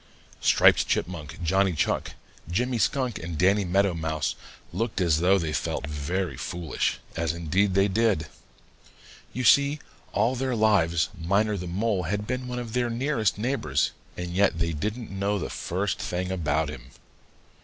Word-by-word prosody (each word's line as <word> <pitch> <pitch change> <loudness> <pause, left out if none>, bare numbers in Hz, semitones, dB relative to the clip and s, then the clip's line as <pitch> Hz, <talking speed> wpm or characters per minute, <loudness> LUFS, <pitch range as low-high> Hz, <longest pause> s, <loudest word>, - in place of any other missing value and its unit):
Striped - - +5
Chipmunk, 85 -2 -3
Johnny 95 +2 +2
Chuck, 75 - -1 0.4
Jimmy 120 +7 0
Skunk, 130 -2 0
and 80 -1 -5
Danny 100 +5 +3
Meadow 95 +1 +2
Mouse 80 -2 -1 0.4
looked 110 +4 -2
as 85 -4 +3
though 95 +3 +4
they 80 -4 -2
felt 70 - -2
very 75 +2 -2
foolish, 85 -3 -2 0.2
as 80 -1 0
indeed 90 +4 +1
they 100 +1 +4
did. 100 -5 +1 1.1
You 130 - -3
see, 140 +4 +5 0.3
all 120 +3 +2
their 130 0 -1
lives 95 -7 +3
Miner 100 +5 +1
the 90 -2 -5
Mole 100 +2 0
had 105 +1 -1
been 125 +2 -3
one 125 0 -4
of 120 -2 -5
their 125 -1 +1
nearest 115 -3 0
neighbors, 105 - 0 0.3
and 90 0 -4
yet 95 -1 +2
they 85 0 0
didn't 105 +9 -4
know 100 +1 0
the - - -4
first 95 +2 -2
thing 90 +1 -3
about 80 -4 0
him. 65 -3 -9
95 Hz, 155 wpm, -26 LUFS, 85-110 Hz, 1.1 s, Striped